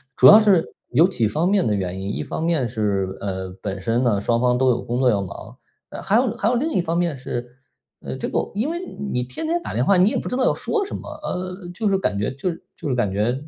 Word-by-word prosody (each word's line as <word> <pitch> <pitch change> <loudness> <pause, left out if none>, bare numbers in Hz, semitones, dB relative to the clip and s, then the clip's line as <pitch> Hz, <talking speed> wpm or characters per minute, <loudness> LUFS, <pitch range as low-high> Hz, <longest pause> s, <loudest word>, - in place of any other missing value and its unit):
主 - - +7
要 210 - +11
是 200 -6 +4 0.3
有 155 +8 +5
几 120 - 0
方 155 - 0
面 200 -1 +3
的 110 - +1
原 95 -2 -2
因。 100 +2 -4
一 - - -3
方 - - -4
面 165 -7 +1
是 100 -4 -1
呃， 95 -1 -4
本 100 -2 -4
身 115 +5 0
呢， 105 -5 +2
双 115 +3 +1
方 125 0 +2
都 130 0 +4
有 120 - +2
工 120 +1 -2
作 130 -1 +4
要 100 -4 +1
忙， 95 - -9 0.3
呃， - - -8
还 210 - +3
有 240 -2 +1
还 220 - -1
有 245 - +1
另 300 +7 0
一 - - +2
方 170 -1 -2
面 170 -4 0
是， 125 -1 -6 0.4
呃， - - -5
这 - - -4
个 - - -1
因 220 +9 -1
为 340 - -2 0.3
你 125 - 0
天 125 - -5
天 340 +2 +1
打 - - -5
电 120 - +1
话 195 +7 +4
你 185 +3 +5
也 - - -1
不 - - -5
知 250 - -2
道 260 - +2
要 - - +3
说 425 -3 -1
什 - - -6
么， - - -7
呃， 185 -4 -5
就 210 +3 0
是 195 - +2
感 185 - -1
觉 105 - 0
就 175 +7 -2
是 165 - -11
就 - - -6
是 135 - 0
感 120 -6 0
觉 105 +5 +1
130 Hz, 300 characters per minute, -22 LUFS, -, 0.4 s, 要